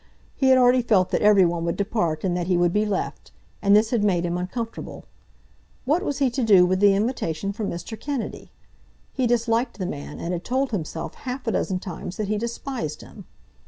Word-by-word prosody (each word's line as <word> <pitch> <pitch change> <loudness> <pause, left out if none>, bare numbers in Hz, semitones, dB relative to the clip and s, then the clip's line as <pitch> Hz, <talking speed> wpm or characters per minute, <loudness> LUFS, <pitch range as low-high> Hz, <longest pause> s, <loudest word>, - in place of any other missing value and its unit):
He 265 - +1
had 260 - +7
already 250 0 +5
felt 205 -6 +2
that - - +1
every 205 -3 +6
one 170 -1 -1
would 170 - -1
depart 185 -7 -1
and 180 -2 0
that 175 -1 -2
he 180 -1 +2
would 175 0 +2
be 210 +1 +1
left, 200 -2 -3 0.3
and 200 0 +5
this 220 +1 +3
had 235 -4 +1
made 180 -4 +2
him 175 0 -1
uncomfortable. 225 +6 -5 0.8
What 305 +7 +2
was 290 -8 -2
he 270 -3 +2
to 255 +1 -1
do 195 -5 +6
with 185 +1 +1
the 200 -1 +5
invitation 200 -4 -2
from 210 0 -3
Mr. 175 +6 -6
Kennedy? 280 -3 -5 0.6
He 255 -3 +1
disliked 235 +1 0
the 190 - -3
man, 145 -5 -6
and 175 - -3
had 175 0 -4
told 260 +1 -1
himself 165 -5 -4
half 255 0 -6
a 225 - 0
dozen 190 -3 -1
times 180 -1 -7
that 210 -2 -3
he 210 0 0
despised 235 - -4
him. 200 -4 -13
205 Hz, 210 wpm, -24 LUFS, 180-240 Hz, 0.8 s, had